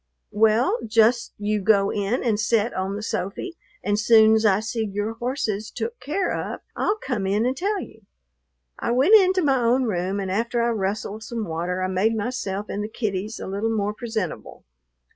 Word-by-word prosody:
"Well, 220 - +3
just 230 +2 +3
you 210 0 -1
go 200 0 +3
in 205 +5 -1
and 220 -4 +1
set 220 +1 +1
on 190 +1 -2
the 210 - -5
sofy 215 - -4 0.3
and 205 0 +1
soon's 220 0 +5
I 195 -1 +3
see 225 +1 -2
your 205 +1 -3
horses 230 -3 -3
took 235 +1 -5
care 305 +9 -1
of - - -4
I'll 420 - 0
come 240 - -3
in 205 +4 +1
and 255 +1 0
tell 400 +7 -1
you." 225 - -10 0.8
I - - -2
went 270 - +4
into 375 -3 +6
my 270 -3 +3
own 240 +3 +3
room, 195 -3 -1
and 190 -1 -3
after 235 +4 0
I 235 - +2
rustled 210 0 -3
some 230 -1 -4
water 175 +2 -2
I - - +1
made 200 +5 +1
myself 205 -3 -3
and 205 - -3
the 210 - -5
kiddies 215 -1 -3
a - - -6
little 200 +4 -2
more 210 -2 -1
presentable. 220 -6 -5
220 Hz, 185 wpm, -24 LUFS, 200-240 Hz, 0.8 s, into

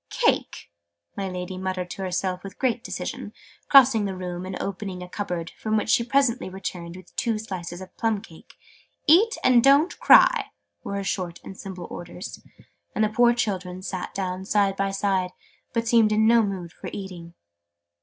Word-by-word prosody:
"Cake!" - - 0 0.4
my 195 -1 -3
Lady 185 0 -5
muttered 185 -1 -3
to - - -6
herself 185 0 -2
with 195 0 -9
great 245 -3 0
decision, - - -5 0.4
crossing 250 -6 +7
the 190 -2 -4
room 180 0 -5
and 190 - -5
opening 195 -2 -4
a - - -8
cupboard, 180 -3 -4
from 220 0 -1
which 215 - -1
she 235 - +4
presently 245 -4 +1
returned 175 -2 -6
with 185 -1 -14
two 230 -2 0
slices 185 -4 -6
of 185 - -11
plum 225 -2 +1
cake. 170 -6 -16 0.5
"Eat, 420 +10 +5
and 245 -2 +5
don't 280 +5 +4
cry!" 485 -5 +6 0.4
were 200 - -4
her 200 - -2
short 180 -3 -3
and 195 - -9
simple 185 -2 -7
orders: 175 +4 -8 0.5
and 215 - +2
the 215 - +2
poor 240 +2 +4
children 185 -5 -2
sat 185 -1 -4
down 185 -1 -3
side 200 0 +2
by 195 0 0
side, 195 -2 0 0.4
but 230 -1 -1
seemed 225 -2 +4
in 215 +1 +3
no 230 +1 +6
mood 190 -5 -3
for - - -8
eating. 175 -4 -8
195 Hz, 175 wpm, -25 LUFS, 180-225 Hz, 0.5 s, crossing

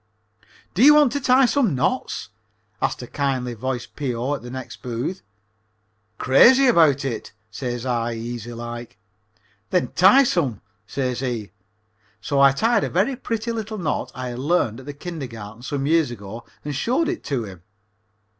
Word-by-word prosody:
"Do 210 - +2
you 295 +2 +9
want 295 -4 +5
to 285 - -2
tie 255 +1 +5
some 240 - +2
knots?" 130 - -1 0.5
asked - - -1
a - - -5
kind 135 -3 -1
voiced 125 +2 -4
P.O. 130 -1 -2
at 145 - -4
the 120 - -9
next 130 0 -8
booth. 125 +9 -4 1.0
"Crazy 245 - +6
about 160 - +4
it," 120 -5 -4 0.2
says 120 +1 -4
I, 120 -2 -1
easy 120 0 -6
like. 120 -1 -7 0.7
"Then 180 - +1
tie 200 +10 +6
some," 145 - 0 0.3
says 125 +2 -2
he. 120 -7 -3 0.7
So 140 +5 -1
I 140 0 +7
tied 220 - +2
a - - -1
very 215 +10 +1
pretty 230 -2 -3
little 220 -1 -4
knot 165 -6 -2
I 130 -1 -4
had 120 0 -6
learned 135 -6 +1
at 130 - -12
the 145 - -5
kindergarten 120 - -8
some 135 +2 -3
years 160 -2 +3
ago 115 0 -8 0.2
and 145 -1 -3
showed 255 - +1
it 355 - -3
to 135 -6 -1
him. 95 -5 -10
135 Hz, 165 wpm, -22 LUFS, 120-190 Hz, 1.0 s, you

